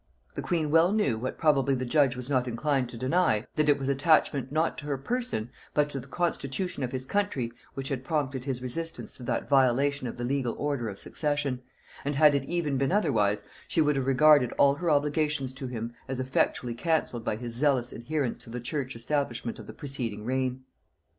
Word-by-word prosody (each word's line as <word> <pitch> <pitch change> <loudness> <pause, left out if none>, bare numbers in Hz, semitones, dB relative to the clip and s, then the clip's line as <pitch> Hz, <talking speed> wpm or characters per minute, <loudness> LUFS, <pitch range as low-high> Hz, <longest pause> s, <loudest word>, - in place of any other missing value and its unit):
The - - -4
queen 160 -4 -1
well 165 +3 +5
knew, 205 - +1
what 130 +3 -4
probably 140 -3 +3
the 130 0 -2
judge 135 0 +3
was 125 0 -3
not 130 -3 +1
inclined 130 +1 0
to 120 - -8
deny, 130 -3 +2
that 150 -1 +2
it 145 - +5
was 135 -1 -4
attachment, 140 -1 +2
not 160 +2 +1
to 150 - -8
her 140 -2 -1
person, 185 - -2 0.2
but 150 0 +2
to 135 - -2
the 130 - -10
constitution 170 +1 -2
of 125 -2 -2
his 130 -1 -3
country, 140 -10 -1 0.2
which 135 0 -4
had 130 -2 -3
prompted 135 -4 -2
his 130 -3 -3
resistance 165 +7 -3
to 125 - -5
that - - -1
violation 135 0 +3
of 120 - -6
the 120 - -4
legal 125 -1 -1
order 140 -6 -1
of 100 - -7
succession; 145 -2 -2 0.4
and 145 +1 -1
had 150 +1 +6
it 140 -1 0
even 150 -4 -1
been 135 +3 +1
otherwise, 105 - +2 0.2
she - - -1
would 150 -2 +3
have 135 -1 -1
regarded 135 -1 +6
all 140 0 +5
her 170 +4 -2
obligations 150 -2 +1
to 130 0 -5
him 120 -1 -5
as 130 -1 -3
effectually 130 -2 0
cancelled 125 -3 -1
by 110 - -1
his 120 +1 -5
zealous 130 -1 +2
adherence 140 +2 -2
to - - -13
the 120 +2 -4
church 130 +1 -3
establishment 120 -1 -2
of - - -10
the - - -7
preceding 125 -8 -4
reign. 130 0 -1
135 Hz, 205 wpm, -28 LUFS, 125-150 Hz, 0.4 s, had